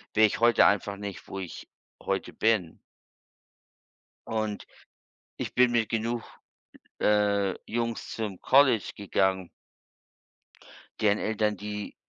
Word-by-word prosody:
wäre 110 0 +6
ich 105 - -4
heute 120 0 +5
einfach 100 0 +1
nicht, 100 -2 -7
wo 95 - -6
ich 90 -3 -8 0.3
heute - - -3
bin. 110 -7 +1 1.5
Und 110 -2 -3 0.7
ich - - -5
bin 125 -1 +4
mit 115 -2 +1
genug, 115 +1 -1 0.8
äh, 100 -2 +2 0.2
Jungs 115 -1 -2
zum 105 -5 -5
College 130 -5 +4
gegangen 95 -2 0 1.5
deren 105 -1 +3
Eltern, 105 -1 0
die, 105 +1 -6
105 Hz, 110 wpm, -27 LUFS, 100-115 Hz, 1.5 s, wäre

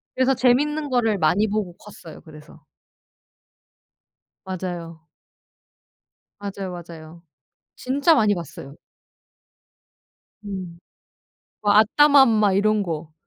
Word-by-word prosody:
그래서 260 +1 +2
재밌는 290 +5 +1
거를 230 -5 +1
많이 180 +6 +2
보고 205 -4 -3
컸어요 175 -6 -13
그래서. 155 -1 -15 1.8
맞아요. 170 -3 -7 1.3
맞아요, 200 -2 -6
맞아요. 170 -1 -11 0.5
진짜 280 +6 +2
많이 215 -7 +2
봤어요. 150 -5 -9 1.7
음. 185 -4 -7 0.8
뭐 205 -1 +2
아따맘마 225 -1 +4
이런 215 +1 +2
거. 160 -3 -6
200 Hz, 195 characters per minute, -22 LUFS, 170-235 Hz, 1.8 s, 아따맘마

